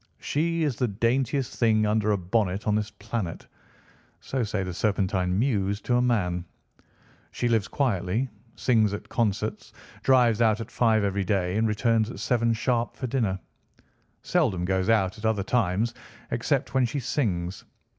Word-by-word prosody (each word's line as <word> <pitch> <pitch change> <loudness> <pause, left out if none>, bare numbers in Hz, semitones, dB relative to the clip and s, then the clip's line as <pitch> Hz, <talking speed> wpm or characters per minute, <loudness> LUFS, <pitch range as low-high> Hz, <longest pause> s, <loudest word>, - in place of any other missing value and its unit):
She 165 +2 0
is 145 -6 0
the 125 - +1
daintiest 120 +5 0
thing 110 -2 +3
under 105 0 +2
a 105 - +2
bonnet 95 +1 -1
on 105 - +2
this 105 0 0
planet. 105 -5 -5 0.7
So 130 - -3
say 105 -2 -2
the 90 -1 -4
Serpentine 95 -2 0
mews, 100 -5 +1
to 120 - 0
a - - +3
man. 90 -8 +1 0.9
She 120 - -2
lives 115 -3 +1
quietly, 115 -3 0 0.3
sings 110 -5 +2
at - - -9
concerts, 105 -1 -1 0.3
drives 120 -4 +4
out 110 -1 +3
at 115 - -7
five 110 -3 +3
every 100 0 0
day, 95 -2 0
and 110 +1 +2
returns 110 +1 +1
at - - -8
seven 115 -2 +1
sharp 120 +1 0
for 125 - -4
dinner. 115 -7 0 0.8
Seldom 90 -2 +1
goes 95 +2 0
out 105 -1 +2
at 110 - -6
other 105 -3 +1
times, 110 +1 +1 0.4
except - - 0
when 130 -1 +3
she 130 +5 -2
sings. 95 - -2
110 Hz, 160 wpm, -26 LUFS, 100-120 Hz, 0.9 s, drives